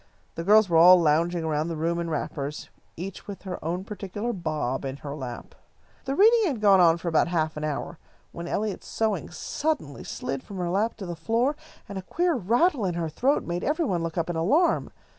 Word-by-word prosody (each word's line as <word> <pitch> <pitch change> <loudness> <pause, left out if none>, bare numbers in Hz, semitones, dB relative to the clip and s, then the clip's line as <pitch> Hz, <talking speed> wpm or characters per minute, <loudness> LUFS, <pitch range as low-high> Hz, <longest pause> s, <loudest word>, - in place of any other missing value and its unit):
The 165 - -5
girls 210 +3 +6
were 165 -2 +4
all 180 +2 +9
lounging 165 +2 +2
around 155 0 -1
the 165 - -3
room 165 +2 -1
in 170 -1 -3
wrappers, 150 -1 -4 0.3
each 185 +3 -7
with 200 -2 -8
her 185 -2 -6
own 175 +4 -2
particular 205 +3 -4
Bob 155 - -2
in 135 0 -4
her 140 0 -7
lap. 125 -5 -7 0.5
The 270 0 -1
reading 445 +5 +5
had 270 -8 -2
gone 200 -2 +5
on 170 -2 +5
for 170 - -7
about 160 -1 +3
half 160 -2 -1
an 150 - -5
hour, 155 +2 -4 0.3
when 170 0 -7
Eliot's 210 +2 -3
sewing 215 -5 -1
suddenly 285 - -3
slid 135 -1 -4
from 200 - -10
her 175 -1 -2
lap 210 +5 0
to 200 - -6
the 175 -1 -5
floor, 230 - 0 0.3
and 200 -1 -5
a - - -6
queer 345 - 0
rattle 240 - +2
in 180 -3 -1
her 165 -2 -2
throat 265 - +1
made 175 0 -3
every 315 +3 0
one 180 - 0
look 165 0 -4
up 165 - 0
in - - -5
alarm. 275 - +2
175 Hz, 215 wpm, -26 LUFS, 160-215 Hz, 0.5 s, all